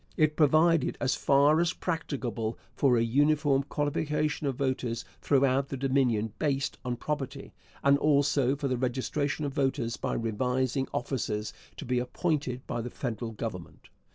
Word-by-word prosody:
It 155 Hz, -1 st, +3 dB
provided, 155 Hz, 0 st, +3 dB
as 130 Hz, -, +1 dB
far 145 Hz, +3 st, +4 dB
as 170 Hz, 0 st, +2 dB
practicable, 125 Hz, -9 st, -3 dB, 0.2 s
for 130 Hz, -4 st, +3 dB
a 115 Hz, -, +3 dB
uniform 145 Hz, +3 st, +3 dB
qualification 150 Hz, +1 st, -1 dB
of 135 Hz, -, -1 dB
voters 130 Hz, -3 st, -2 dB, 0.2 s
throughout 135 Hz, -1 st, +2 dB
the 135 Hz, -, -4 dB
Dominion 125 Hz, -5 st, +1 dB
based 140 Hz, -3 st, -1 dB
on 125 Hz, -1 st, -2 dB
property, 140 Hz, 0 st, -4 dB, 0.3 s
and 140 Hz, 0 st, +5 dB
also 140 Hz, -2 st, +3 dB
for 140 Hz, 0 st, -2 dB
the 130 Hz, -2 st, 0 dB
registration 135 Hz, +4 st, -1 dB
of 140 Hz, -, -3 dB
voters 135 Hz, -4 st, 0 dB
by -, -, -2 dB
revising 125 Hz, +4 st, 0 dB
officers 110 Hz, -4 st, -2 dB, 0.2 s
to -, -, -7 dB
be 125 Hz, 0 st, +1 dB
appointed 130 Hz, -1 st, -2 dB
by 120 Hz, -, -3 dB
the 120 Hz, -, -5 dB
federal 120 Hz, -2 st, -4 dB
Government. 105 Hz, -6 st, -7 dB
135 Hz, 150 wpm, -29 LUFS, 125-145 Hz, 0.3 s, and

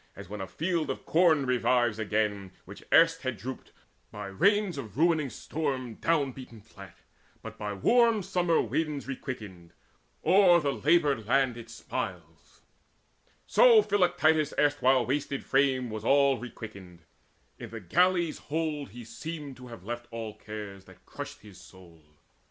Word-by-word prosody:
As -, -, -10 dB
when 105 Hz, +1 st, -7 dB
a 95 Hz, -, -5 dB
field 165 Hz, -, -2 dB
of -, -, -5 dB
corn 160 Hz, -4 st, +3 dB
revives 120 Hz, -3 st, +1 dB
again 105 Hz, -3 st, -1 dB
Which -, -, -11 dB
erst 165 Hz, 0 st, +5 dB
had 130 Hz, -4 st, -3 dB
drooped, 125 Hz, +6 st, -8 dB, 0.4 s
by -, -, -7 dB
rains 200 Hz, -, +2 dB
of 115 Hz, -2 st, -9 dB
ruining 160 Hz, -3 st, +2 dB
storm 130 Hz, -1 st, -4 dB
Down 150 Hz, 0 st, 0 dB
beaten 125 Hz, -3 st, -11 dB
flat, 100 Hz, -4 st, -14 dB, 0.5 s
but -, -, -8 dB
by 105 Hz, -1 st, -3 dB
warm 230 Hz, -, +3 dB
summer 180 Hz, -3 st, +1 dB
winds 150 Hz, -4 st, -2 dB
Requickened, 105 Hz, -10 st, -7 dB, 0.5 s
o'er 180 Hz, 0 st, +6 dB
the 145 Hz, -3 st, -1 dB
laboured 140 Hz, -10 st, +2 dB
land 130 Hz, -1 st, +2 dB
it 115 Hz, -1 st, -10 dB
smiles, 115 Hz, -, -7 dB, 0.8 s
So 470 Hz, -4 st, +6 dB
Philoctetes' 175 Hz, -, +2 dB
erstwhile 135 Hz, -4 st, +3 dB
wasted 140 Hz, +1 st, -2 dB
frame 130 Hz, -3 st, +1 dB
Was 110 Hz, -1 st, -6 dB
all 140 Hz, 0 st, +3 dB
requickened: 100 Hz, -7 st, -10 dB, 0.6 s
in -, -, -8 dB
the 115 Hz, -, -7 dB
galley's 175 Hz, -, +1 dB
hold 150 Hz, -2 st, -3 dB
He 120 Hz, +3 st, -11 dB
seemed 150 Hz, +2 st, -7 dB
to 125 Hz, -1 st, -11 dB
have 115 Hz, -7 st, -11 dB
left 120 Hz, +3 st, -6 dB
all 115 Hz, -2 st, -6 dB
cares 105 Hz, -3 st, -9 dB
that -, -, -18 dB
crushed -, -, -8 dB
his 100 Hz, -3 st, -14 dB
soul. 85 Hz, -4 st, -17 dB
130 Hz, 145 wpm, -28 LUFS, 110-160 Hz, 0.8 s, o'er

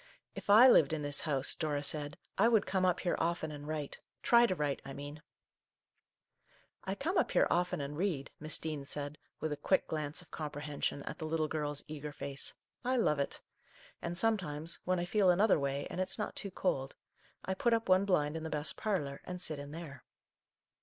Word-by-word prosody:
" -, -, -47 dB
If -, -, -18 dB
I 220 Hz, +5 st, +9 dB
lived 160 Hz, -, +6 dB
in 155 Hz, -2 st, -2 dB
this 145 Hz, +1 st, +1 dB
house/' 135 Hz, -2 st, +3 dB
Dora 150 Hz, -3 st, -1 dB
said, 145 Hz, 0 st, -1 dB
" -, -, -45 dB
I 215 Hz, -, +6 dB
would 225 Hz, -3 st, +4 dB
come 190 Hz, -1 st, +1 dB
up 180 Hz, -1 st, +2 dB
here 175 Hz, -, +1 dB
often 165 Hz, -1 st, -1 dB
and 145 Hz, 0 st, -8 dB
write, 150 Hz, -2 st, -3 dB
— -, -, -48 dB
try 235 Hz, 0 st, +6 dB
to 185 Hz, -, 0 dB
write, 145 Hz, -4 st, -1 dB
I 135 Hz, -, -7 dB
mean! 145 Hz, +2 st, -8 dB, 0.8 s
" -, -, -37 dB
"I 190 Hz, +1 st, -2 dB
come 345 Hz, -, 0 dB
up -, -, +1 dB
here -, -, +4 dB
often 175 Hz, -1 st, +1 dB
and 140 Hz, +1 st, -4 dB
read," 160 Hz, -5 st, -1 dB
Miss 155 Hz, +1 st, -1 dB
Dean 155 Hz, -3 st, -4 dB
said, 145 Hz, +1 st, -3 dB, 0.2 s
with 155 Hz, -, -2 dB
a 150 Hz, -, -2 dB
quick 185 Hz, +6 st, +2 dB
glance 150 Hz, -1 st, -2 dB
of 180 Hz, -, -10 dB
comprehen 150 Hz, -1 st, -5 dB
sion 140 Hz, -, 0 dB
at -, -, -6 dB
the 155 Hz, -, -3 dB
little 155 Hz, -1 st, 0 dB
girl's 150 Hz, -2 st, -2 dB
eager 150 Hz, -1 st, -6 dB
face. 140 Hz, -1 st, -4 dB
" -, -, -50 dB
I -, -, +2 dB
love 150 Hz, -11 st, +2 dB
it! 140 Hz, -, -2 dB, 0.6 s
And 170 Hz, +1 st, -3 dB
sometimes, 170 Hz, -7 st, 0 dB
when 185 Hz, 0 st, +1 dB
I 175 Hz, -, -1 dB
feel 195 Hz, +1 st, +3 dB
another 190 Hz, +1 st, +5 dB
way 140 Hz, 0 st, -1 dB
and 185 Hz, -, -2 dB
it's 185 Hz, -, +1 dB
not 210 Hz, -, -3 dB
too 200 Hz, -, -1 dB
cold, 135 Hz, -8 st, -1 dB, 0.5 s
I 190 Hz, -, 0 dB
put 235 Hz, +5 st, +1 dB
up 230 Hz, 0 st, +1 dB
one 185 Hz, +1 st, +5 dB
blind 150 Hz, -6 st, +2 dB
in 160 Hz, -, -3 dB
the 160 Hz, -, -4 dB
best 150 Hz, 0 st, -1 dB
parlour, 150 Hz, -10 st, -2 dB
and 180 Hz, 0 st, -6 dB
sit 155 Hz, -4 st, -2 dB
in 145 Hz, 0 st, -7 dB
there." 150 Hz, -4 st, -8 dB
155 Hz, 220 wpm, -33 LUFS, 145-185 Hz, 0.8 s, I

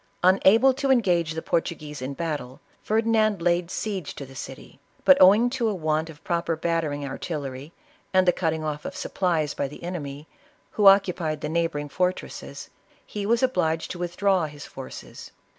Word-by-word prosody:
Una 190 Hz, +3 st, +6 dB
ble 265 Hz, +3 st, +4 dB
to 275 Hz, +1 st, -2 dB
engage 175 Hz, -11 st, +2 dB
the 160 Hz, -, -5 dB
Portuguese 150 Hz, -4 st, -2 dB
in 135 Hz, +2 st, -4 dB
battle, 145 Hz, -6 st, -4 dB, 0.2 s
Ferdinand 220 Hz, -2 st, +2 dB
laid 170 Hz, 0 st, +1 dB
siege 190 Hz, -6 st, -4 dB
to 140 Hz, -, -7 dB
the 135 Hz, -, -14 dB
city; 130 Hz, +1 st, -9 dB, 0.3 s
but 280 Hz, -, +9 dB
owing 205 Hz, +6 st, +7 dB
to 240 Hz, -4 st, 0 dB
a 210 Hz, -, -2 dB
want 155 Hz, -1 st, -1 dB
of 150 Hz, -1 st, -13 dB
proper 170 Hz, -1 st, -1 dB
bat 165 Hz, +1 st, 0 dB
tering 145 Hz, -2 st, -3 dB
artillery, 140 Hz, -1 st, -5 dB, 0.4 s
and 185 Hz, -1 st, +3 dB
the -, -, +7 dB
cutting 160 Hz, -2 st, -1 dB
off 150 Hz, -1 st, -3 dB
of -, -, -6 dB
supplies 165 Hz, -6 st, -1 dB
by 140 Hz, -, -2 dB
the 145 Hz, -, -12 dB
enemy, 150 Hz, -4 st, -6 dB, 0.4 s
who 205 Hz, -2 st, +3 dB
occupied 180 Hz, -6 st, +4 dB
the 150 Hz, -, -3 dB
neighboring 160 Hz, -3 st, -1 dB
fortresses, 180 Hz, +5 st, -3 dB, 0.3 s
he 205 Hz, -1 st, -5 dB
was 235 Hz, +3 st, +2 dB
obliged 165 Hz, -10 st, 0 dB
to 175 Hz, -, -7 dB
withdraw 180 Hz, 0 st, +1 dB
his 145 Hz, -1 st, -10 dB
forces. 135 Hz, -, -10 dB
170 Hz, 175 wpm, -25 LUFS, 150-195 Hz, 0.4 s, but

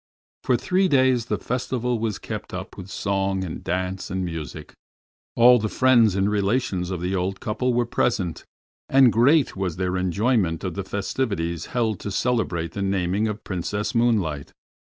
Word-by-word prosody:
For 125 Hz, -2 st, +2 dB
three 185 Hz, +10 st, +1 dB
days 130 Hz, -6 st, +3 dB
the -, -, 0 dB
festival 125 Hz, -1 st, -2 dB
was 110 Hz, -3 st, -2 dB
kept -, -, -6 dB
up -, -, -7 dB
with 95 Hz, 0 st, -9 dB
song 95 Hz, -1 st, -1 dB
and 85 Hz, -4 st, -6 dB
dance 95 Hz, +1 st, -3 dB
and 95 Hz, 0 st, -2 dB
music. 80 Hz, -3 st, -7 dB, 0.6 s
All 120 Hz, +1 st, +7 dB
the 110 Hz, 0 st, -2 dB
friends 120 Hz, -6 st, +4 dB
and 95 Hz, 0 st, +2 dB
relations 100 Hz, -3 st, 0 dB
of 90 Hz, -3 st, -4 dB
the 90 Hz, +2 st, -2 dB
old 95 Hz, +1 st, -2 dB
couple 120 Hz, +3 st, -1 dB
were 120 Hz, 0 st, +2 dB
present, 95 Hz, -7 st, -1 dB, 0.5 s
and 135 Hz, -3 st, +6 dB
great 135 Hz, +6 st, +4 dB
was 95 Hz, -4 st, -2 dB
their 90 Hz, 0 st, -1 dB
enjoyment 95 Hz, -1 st, +1 dB
of 95 Hz, -3 st, -3 dB
the 100 Hz, -, -4 dB
festivities 95 Hz, -4 st, -2 dB
held 110 Hz, -5 st, -1 dB
to -, -, -5 dB
celebrate 95 Hz, -7 st, -1 dB
the 100 Hz, -, -5 dB
naming 95 Hz, +2 st, 0 dB
of 105 Hz, 0 st, -5 dB
Princess 100 Hz, +5 st, -3 dB
Moonlight. 105 Hz, -, 0 dB
100 Hz, 165 wpm, -24 LUFS, 90-120 Hz, 0.6 s, All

